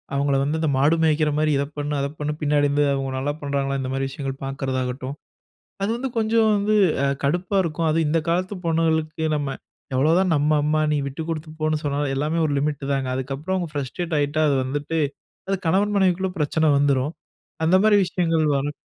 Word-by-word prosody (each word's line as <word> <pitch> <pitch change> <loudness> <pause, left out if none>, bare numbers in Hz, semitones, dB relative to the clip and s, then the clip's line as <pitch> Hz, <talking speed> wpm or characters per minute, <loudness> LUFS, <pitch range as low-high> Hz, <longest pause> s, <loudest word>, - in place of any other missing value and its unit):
அவங்கள 140 0 +1
வந்து 150 +3 0
இந்த 160 - 0
மாடு 145 +5 +4
மேய்க்ற 155 -1 +3
மாரி 155 0 +2
இத 140 - +1
பண்ணு, 145 0 -2
அத 140 - 0
பண்ணு 150 0 -2
பின்னாடி 145 -1 +2
இருந்து 145 +1 +2
அவங்க 135 -1 -2
நல்லா 140 +2 -1
பண்றாங்களா? 140 -1 -1
இந்த 130 - -3
மாரி 135 0 -1
விஷயங்கள் 135 0 -5
பாக்கறதாகட்டும், 130 -1 -3 0.7
அது 200 - 0
வந்து 260 +2 -3
கொஞ்சம் 220 0 +3
வந்து, 205 +1 +1 0.3
அ - - +3 0.2
கடுப்பா 180 +7 0
இருக்கும். 165 -1 -1
அதுவும் 160 0 +1
இந்த 165 +1 +2
காலத்து 185 +4 0
பொண்ணுங்களுக்கு 160 -1 0
நம்ம, 140 -2 -2 0.4
எவ்ளோதான் 165 +6 +3
நம்ம 145 +1 +2
அம்மா, 155 +1 +1
நீ - - +1
விட்டு 150 +4 -5
குடுத்து 155 -1 -4
போனு 155 0 0
சொன்னாலு, 145 0 -1
எல்லாமே 150 +4 0
ஒரு 145 - 0
லிமிட் 145 -1 -2
தாங்க 135 -2 -1
அதுக்கப்றம் 135 +8 -3
அவங்க 175 -3 -3
ஃப்ரஸ்ட்ரேட் 155 +5 -3
ஆயிட்டா 145 +2 +1
அது 140 - +2
வந்துட்டு, 145 +5 -2 0.5
அது 195 - +1
கணவன் 205 +4 +2
மனைவிக்குள்ள 190 0 +2
பிரச்சன 155 +1 +2
வந்துரும். 140 +1 +1 0.5
அந்த 170 +3 +4
மாரி 215 -1 +6
விஷயங்கள் 165 -3 +1
வரக் 145 +2 -2
150 Hz, 185 wpm, -23 LUFS, 140-165 Hz, 0.7 s, மாரி